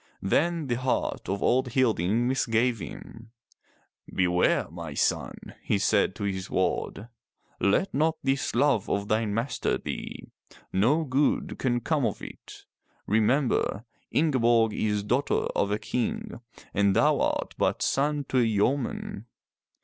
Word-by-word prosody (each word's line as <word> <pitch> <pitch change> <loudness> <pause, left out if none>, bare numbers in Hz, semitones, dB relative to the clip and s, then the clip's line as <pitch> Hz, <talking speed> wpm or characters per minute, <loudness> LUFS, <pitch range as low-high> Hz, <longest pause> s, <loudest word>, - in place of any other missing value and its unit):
Then 165 - +1
the 120 -3 -1
heart 130 0 -1
of 100 +1 -2
old 125 -1 +2
Hilding 115 -2 +2
misgave 120 -2 +1
him. 115 +4 -9 0.8
"Beware 90 -1 +2
my 85 -4 -7
son,'' - - -1
he 105 - 0
said 100 -1 +2
to 105 - -6
his 95 -2 -3
ward. 105 - -1 0.5
"Let 135 - +2
not 160 +3 +1
this 135 -2 0
love 135 -5 +2
of 100 0 -1
thine 110 -1 +1
master 115 +5 -1
thee. - - -6 0.5
No 125 +12 +3
good 140 0 0
can 120 -2 0
come 150 -4 +1
of - - -4
it. - - -11 0.4
Remember, 110 0 +1 0.2
Inge 150 -4 +2
borg 115 -2 +4
is 105 -1 0
daughter 125 +7 0
of 100 - +1
a 105 - 0
King 115 +1 -3 0.3
and 100 -1 +2
thou - - +3
art - - -1
but - - +1
son 145 +1 +1
to 130 - +2
a - - +5
yeoman." 115 0 -1
115 Hz, 140 wpm, -27 LUFS, 100-135 Hz, 0.8 s, a